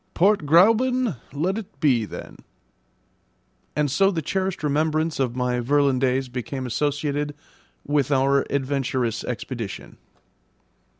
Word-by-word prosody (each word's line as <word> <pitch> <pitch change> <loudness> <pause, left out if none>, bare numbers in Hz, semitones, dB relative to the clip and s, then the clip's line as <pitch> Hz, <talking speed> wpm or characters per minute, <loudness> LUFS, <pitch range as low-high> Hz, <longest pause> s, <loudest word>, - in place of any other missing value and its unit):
"Port 190 -3 +3
Gräuben 225 - +4
let 180 +9 -1
it 180 -9 -12
be 125 -7 +3
then." - - -9 1.4
And 150 -2 +1
so 195 +8 +4
the 165 -5 -2
cherished 190 +1 -2
remembrance 155 +2 0
of 125 -3 0
my 125 -1 0
Virlandaise 135 0 +2
became 125 +2 -5
associated 145 +3 -1 0.5
with 145 -1 +1
our 140 0 +3
adventurous 130 -4 -1
expedition. 120 -3 -6
145 Hz, 110 wpm, -24 LUFS, 130-160 Hz, 1.4 s, Gräuben